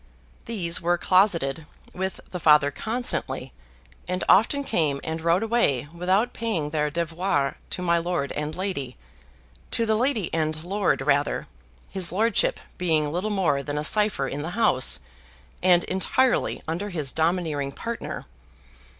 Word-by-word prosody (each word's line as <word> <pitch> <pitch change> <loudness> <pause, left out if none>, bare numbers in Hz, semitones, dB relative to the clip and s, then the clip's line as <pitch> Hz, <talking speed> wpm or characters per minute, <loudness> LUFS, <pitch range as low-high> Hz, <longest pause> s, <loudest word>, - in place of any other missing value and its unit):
These 180 -7 0
were 175 +1 +2
closeted 165 -6 +2 0.3
with 190 +1 -4
the 180 - -4
Father 150 -3 +5
constantly, 230 - -3 0.5
and 180 0 -2
often 280 +8 +4
came 155 - 0
and 160 0 -4
rode 170 +5 +2
away 180 - +1
without 190 +7 +1
paying 175 -11 -2
their 150 -1 0
devoirs 165 -2 -1 0.2
to 180 - -3
my 170 -1 +3
lord 170 -4 -2
and 150 +1 -4
lady 170 -9 -4 0.7
to 230 - +2
the 220 - +2
lady 230 -4 0
and 155 -1 -1
lord 195 -3 0
rather 145 0 +1 0.5
his 185 -3 -1
lordship 215 +3 +2 0.2
being 155 -4 +1
little 180 +6 -1
more 180 -9 +1
than 145 +1 -4
a 150 - -1
cipher 210 -7 +2
in 140 +2 -4
the 160 - -4
house, 130 - +3 0.6
and 175 -1 +5
entirely 240 +7 +1
under 175 +6 -3
his 155 -8 +1
domineering 160 -4 0
partner. 230 +10 -5
170 Hz, 140 wpm, -25 LUFS, 150-195 Hz, 0.7 s, Father